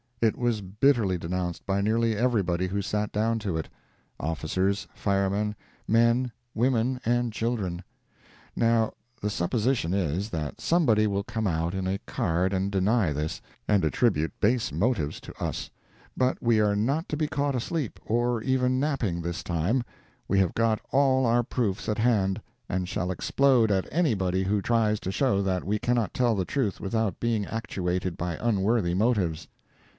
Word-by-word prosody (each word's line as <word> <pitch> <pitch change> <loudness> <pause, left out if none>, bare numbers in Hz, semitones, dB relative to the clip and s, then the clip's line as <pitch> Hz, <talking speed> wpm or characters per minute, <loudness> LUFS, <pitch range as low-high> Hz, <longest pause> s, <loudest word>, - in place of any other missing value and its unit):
It 115 -2 +2
was 120 -3 0
bitterly 105 0 +2
denounced 90 0 -3
by 100 0 0
nearly 110 +2 +2
everybody 100 -7 +1
who 100 +2 -1
sat 105 +1 -1
down 115 +2 +1
to 95 -6 -2
it—officers, 80 +5 -3
firemen, 100 +1 0 0.3
men, 115 +2 +3 0.2
women 125 +1 +1
and 120 0 +1
children. 105 -7 -2 0.7
Now, 115 -1 +2 0.3
the 105 -1 -2
supposition 105 0 0
is, 95 +2 -1
that 75 -7 -4
somebody 120 -11 +3
will 100 -1 -1
come 110 +2 -3
out 85 0 -1
in 95 -1 -2
a 95 +1 -1
card 95 -5 0
and 95 +1 0
deny 100 -3 +2
this, 75 +2 -3 0.3
and 105 -4 +3
attribute 80 -1 +1
base 115 -3 +2
motives 85 - 0
to - - -9
us: - - -3 0.5
but 130 0 +1
we 115 -2 +3
are 105 -1 +3
not 135 +11 0
to 150 - -2
be 155 0 0
caught 140 -1 -1
asleep, 135 +1 -3
or 120 +1 +1
even 130 -1 +1
napping, 125 - -1
this 85 +1 -4
time—we 95 +2 -2
have 95 -3 +2
got 115 -1 +2
all 130 -1 +3
our 120 +1 +3
proofs 110 -5 -2
at 105 - -1
hand, 105 -5 +2 0.3
and 90 0 -1
shall 90 -1 -2
explode 120 +3 +3
at 95 -2 +1
anybody 95 - +1
who 100 +2 +1
tries 110 -1 +2
to 95 - -4
show 110 -3 +2
that 95 -2 0
we 105 +2 0
cannot 120 -5 0
tell 120 -3 +2
the 95 -2 -1
truth 120 -6 -1
without 105 -1 -1
being 115 -3 0
actuated 90 -5 -2
by 85 -2 -3
unworthy 105 -4 +1
motives. 95 -6 +1
105 Hz, 160 wpm, -27 LUFS, 95-120 Hz, 0.7 s, men